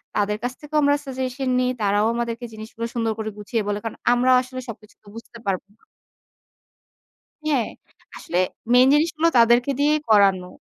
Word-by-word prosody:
তাদের 210 0 0
কাছ 245 +1 -2
থেকেও 300 0 -3
আমরা 285 0 +4
সাজেশন 260 0 -3
নেই। 255 0 +1
তারাও 205 +1 +2
আমাদেরকে 235 0 -3
জিনিসগুলো 220 +1 -7
সুন্দর 230 -1 0
করে 220 0 -3
গুছিয়ে 215 +2 -2
বলে। 205 0 -1
কারণ 225 - -5 0.2
আমরাও 255 +1 +4
আসলে 255 0 -7
সবকিছু 215 -2 -11
তো - - -23
বুঝতে 230 0 -11
পারব 190 -2 0
না। - - -37 1.6
হ্যাঁ। 275 -7 +1 0.5
আসলে 175 - -4 0.4
মেইন 250 +1 +7
জিনিস 305 +3 +3
গুলো 330 +1 +3
তাদেরকে 240 +3 +4
দিয়েই 300 +1 +3
করানো। 195 -4 +4
235 Hz, 165 wpm, -22 LUFS, 215-260 Hz, 1.6 s, মেইন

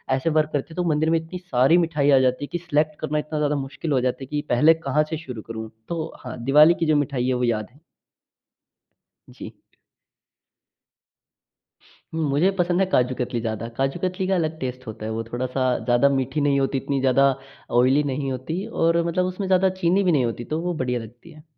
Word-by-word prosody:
ऐसे 135 +5 -1
वर्क 155 -1 +2
करते 145 - -1
हैं, - - -13
तो 180 - -1
मंदिर 155 +1 +1
में 165 - +3
इतनी 165 +3 -8
सारी 165 -3 +3
मिठाई 155 -4 +1
आ 135 - +6
जाती 130 +2 +1
हैं - - -15
कि - - -1
सिलेक्ट 155 -1 0
करना 155 0 -1
इतना 150 0 -4
ज़्यादा 150 0 +1
मुश्किल 140 +3 -4
हो 130 -3 +2
जाती 130 +1 -2
है - - -19
कि, 150 -1 -2
पहले 150 +7 +5
कहाँ 150 +3 +3
से 160 - -3
शुरू 125 -8 -8
करूँ? 110 0 -7 0.2
तो 165 -1 -4
हाँ, 125 - -8
दिवाली 150 +6 +6
की 165 - +1
जो 155 -1 +3
मिठाई 135 -3 0
है, 130 - +1
वो 125 0 -1
याद 110 -3 0
है। 145 - -22 1.5
जी। - - -10 2.6
मुझे 155 +3 +2
पसंद 175 +1 +2
है 195 - +4
काजू 125 0 +2
कतली 120 -1 -2
ज़्यादा। 110 0 -3
काजू 135 +5 -1
कतली 185 +1 -1
का 190 - +2
अलग 160 -2 -1
टेस्ट 130 0 -5
होता 110 0 -7
है, 110 - -3
वो 115 +1 -3
थोड़ा-सा 125 +3 -3 0.2
ज़्यादा 120 +3 +3
मीठी 135 +2 -1
नहीं 140 -1 +2
होती, 135 0 0
इतनी 140 +1 -2
ज़्यादा 135 +1 +4 0.5
ऑयली 130 +4 +4
नहीं 135 0 -2
होती 160 - -4
और 170 -6 +1
मतलब 180 +2 0
उसमे 185 +2 -3
ज़्यादा 190 0 +3
चीनी 180 +4 +3
भी 180 - +3
नहीं 140 -6 +2
होती, 120 +1 -4
तो 155 +1 -3
वो 175 0 -2
बढ़िया 125 -5 -2
लगती 120 +8 -12
है। 155 -1 -15
145 Hz, 210 wpm, -23 LUFS, 130-165 Hz, 2.6 s, आ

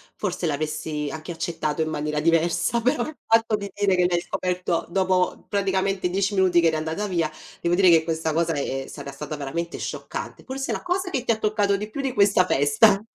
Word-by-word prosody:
forse 185 -3 -3
l'avessi 150 0 -2
anche 160 +2 -6
accettato, 160 -2 -2
in 155 - 0
maniera 150 -1 -2
diversa, 170 +7 +2
però, 245 +1 +1
il 310 - -8
fatto 225 -1 +3
di 200 -2 -5
dire, 200 -2 +2
che 180 0 +3
l'hai 175 -1 +2
scoperto 180 -1 -2
dopo, 185 0 +1
praticamente, 195 -2 0
10 195 +2 0
minuti 185 -2 +4
che 165 - +4
eri 160 - +2
andata 160 +6 -2
via, 165 -4 0 0.3
devo 170 0 +1
dire 185 0 +5
che 165 -2 +6
questa 160 -1 -1
cosa 165 0 +1
è 135 -2 -2
sarà 140 -1 -8
stata, 150 +2 -6
veramente, 170 +5 -4
scioccante, - - -6
forse, 270 +1 -4
la - - -4
cosa 365 +1 -1
che 265 -7 -2
ti 230 -3 +1
toccato 210 -2 +2
di 210 +1 -5
più, 275 +6 -4
di 270 -2 -2
questa 200 -4 +4
festa. 165 +9 +4
175 Hz, 200 wpm, -24 LUFS, 160-200 Hz, 0.3 s, che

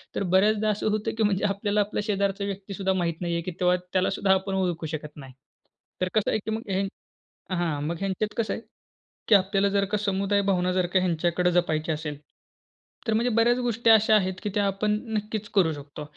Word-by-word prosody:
तर - - 0
बऱ्याचदा 215 +2 +3
असं 210 +1 0
होतं 215 +1 -2
की 225 - +2
म्हणजे 205 -1 +1
आपल्याला 205 +1 -1
आपला 205 0 0
शेजारचा 200 -1 -1
व्यक्तीसुद्धा 195 -1 -3
माहीत 170 -2 -2
नाही 170 -1 -1
आहे. 170 - 0
की 185 - -5
तेव्हा 180 0 +4 0.2
त्यालासुद्धा 190 +1 +2
आपण 190 0 -1
ओळखू 175 -4 -1
शकत 150 0 -12
नाही. 135 -2 -11 0.7
तर 185 - +2
कसं 215 -2 +1
आहे? - - +1
की 220 - -2
मग 220 -2 -4
ह 195 +1 +1 0.7
हां, 165 -5 -1
मग 170 - -2
ह्यांच्यात 195 +2 -2
कसं 220 -4 0
आहे? - - -5 0.7
की 215 - +7
आपल्याला 195 +1 +2
जर 200 0 +1
का 210 - +2
समुदाय 200 0 +1
भावना 180 -1 +1
जर 185 -1 +1
का 185 +2 +2
ह्यांच्याकडं 175 0 +1
जपायची 165 -2 +1
असेल, 150 -2 -4 0.9
तर 220 - +2
म्हणजे 235 +3 +2
बऱ्याच 235 +2 +4
गोष्टी 240 -2 +1
अशा 220 0 +6
आहेत 190 -3 +2
की 210 - -1
त्या 205 -1 +2
आपण 205 +2 0 0.2
नक्कीच 210 0 -3
करू 180 -5 +4
शकतो. 145 0 -9
195 Hz, 200 wpm, -26 LUFS, 180-210 Hz, 0.9 s, की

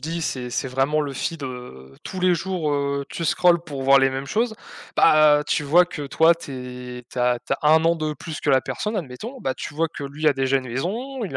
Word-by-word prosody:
dis 165 +4 -4
c'est 125 -6 -3
c'est 135 +3 -2
vraiment 135 +4 +1
le 145 -2 -3
feed, 165 +3 -4
heu, 125 - -8
tous 185 - -6
les 180 0 +4
jours. 175 -3 -2
Heu, 140 0 -1
tu 165 - -5
scrolles 170 +1 +3
pour 140 -4 -6
voir 135 +1 +6
les 135 0 +3
mêmes 135 +1 -4
choses. 220 +8 0 0.4
Bah, 155 -1 +6
tu 150 - 0
vois 175 +5 +5
que, 160 -4 -7
toi, 160 +4 +4
tu 125 -5 -8
es 125 - -12
tu - - -7
as 125 0 +2
tu 125 +3 -2
as 150 +2 +1
1 165 +2 +4
de 155 -1 -2
plus 150 +2 -7
que 145 - 0
la 130 -1 +5
personne, 210 - -4
admettons. 190 - -7
Bah, 130 - -2
tu - - -7
vois 165 +2 0
que 145 - -8
lui 150 +3 0
a 145 - +2
déjà 135 0 +1
une 130 -1 -8
maison, 225 - -3
il 165 -10 -4
145 Hz, 245 wpm, -23 LUFS, 130-170 Hz, 0.4 s, voir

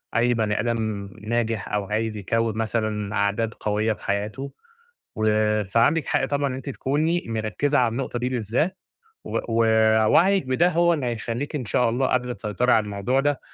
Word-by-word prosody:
أي 120 +1 +3
بني 110 -2 0
آدم 110 -4 -2
ناجح 115 -1 -1
أو 105 -1 0
عايز 110 +1 -2
يكوّن 110 +2 -1
مثلًا 110 -2 -2
عادات 105 +3 0
قوية 105 +1 0
في - - -15
حياته. 105 +7 -3 0.7
و 110 - -1 0.4
فعَندِك 115 +11 +2
حق 145 - +1
طبعًا 145 -1 0
إن 130 - -4
أنتِ 135 +2 -7
تكوني 155 +7 0
مركّزة 115 +6 0
على 120 -2 +3
النقطة 125 +1 -3
دي 125 +1 -1
بالذات، 130 - -1 0.5
و - - -2
ووعيك 115 - +3
بده 145 +8 +3
هو 170 0 +3
اللي 135 -5 -2
هيخلّيكِ 120 +5 -3
إن 130 - -3
شاء 120 +2 +1
الله 130 +3 +1
قادرة 125 -1 0
تسيطري 105 +4 0
على 110 - +4
الموضوع 105 +6 0
ده 145 -1 0
115 Hz, 170 wpm, -24 LUFS, 110-135 Hz, 0.7 s, على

